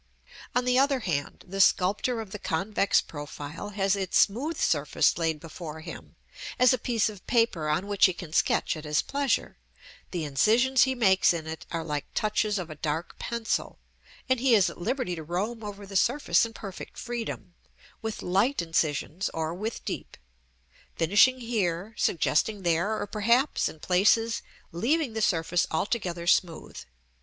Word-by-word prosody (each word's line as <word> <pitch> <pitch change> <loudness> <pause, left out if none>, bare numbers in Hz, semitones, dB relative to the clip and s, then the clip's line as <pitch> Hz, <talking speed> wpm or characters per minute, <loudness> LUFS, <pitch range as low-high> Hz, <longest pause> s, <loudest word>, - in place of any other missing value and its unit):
On 245 0 +2
the 250 0 +3
other 275 -1 +2
hand, 145 -9 -3
the 195 +2 -1
sculptor 205 +7 +2
of 210 -4 -10
the 210 - -6
convex 195 +4 +1
profile 145 +4 -7
has 195 -1 +1
its 190 -2 0
smooth 270 +11 +2
surface 145 -2 +2
laid 160 -2 -1
before 160 0 -8
him, 165 0 -10 0.4
as 250 -1 +5
a 255 - 0
piece 230 -1 +1
of 205 -4 -9
paper 230 -10 +1
on 155 +6 0
which 205 -1 +4
he 185 - -2
can 170 -3 -9
sketch - - +2
at 155 - -8
his 150 -1 +1
pleasure; 280 -2 -1 0.5
the 175 -3 -3
incisions 230 - +3
he 265 0 -1
makes 190 -6 +4
in 160 -2 -5
it 160 0 -7
are 165 -1 -3
like 150 -3 -3
touches 215 0 +1
of 175 -4 -5
a 155 - -11
dark 160 +2 -3
pencil; 235 -2 -2 0.5
and 260 -1 +2
he 250 -1 +4
is 200 -4 +3
at - - -13
liberty 255 -1 -1
to 165 - -5
roam 200 +8 -3
over 205 -1 -7
the 195 0 -10
surface 240 +3 +3
in 225 - -13
perfect 195 -4 -9
freedom, 235 -6 -5 0.5
with 220 -1 -5
light 200 +10 +1
incisions 165 +1 -1
or 160 0 -2
with 215 +6 -5
deep; - - -5 0.8
finishing 205 +10 +4
here, 205 -4 -2
suggesting 195 +4 +1
there, 175 +6 +1
or - - -2
perhaps 235 +7 +1
in 160 - -12
places 215 +7 +2 0.3
leaving 255 - 0
the 220 - -2
surface 175 -2 +1
altogether 175 -1 -2
smooth. 175 -1 +1
195 Hz, 165 wpm, -27 LUFS, 165-230 Hz, 0.8 s, as